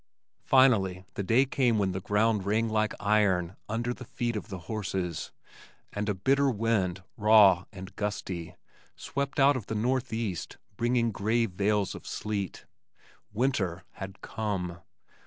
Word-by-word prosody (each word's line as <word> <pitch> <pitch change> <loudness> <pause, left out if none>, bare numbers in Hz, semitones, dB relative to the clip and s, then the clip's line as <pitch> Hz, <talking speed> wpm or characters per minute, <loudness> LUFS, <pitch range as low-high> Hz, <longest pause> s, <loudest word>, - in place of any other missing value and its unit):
Finally 100 -9 +4
the - - -3
day 115 +8 +3
came 125 -4 +2
when 100 -2 +1
the 95 - -3
ground 105 +1 +2
rang 110 +3 +1
like 110 -1 0
iron 100 -4 +2
under 120 +3 -1
the - - -10
feet 120 -1 -3
of 105 - -4
the 95 - -5
horses, 95 -6 -3 0.6
and 105 0 -2
a 105 - 0
bitter 135 +8 +2
wind, 100 -6 0
raw 105 -4 +6
and 95 0 -10
gusty, 95 -5 -4 0.4
swept 140 +1 -3
out 140 +1 +6
of 115 -6 -5
the 110 - -3
northwest, 115 -5 -2 0.2
bearing 120 +1 +1
gray 110 +3 +1
veils 100 0 0
of - - -10
sleet. 100 -4 -4 0.7
Winter 105 -7 0
had 95 0 -9
come! 95 -5 -3
105 Hz, 140 wpm, -29 LUFS, 95-115 Hz, 0.7 s, raw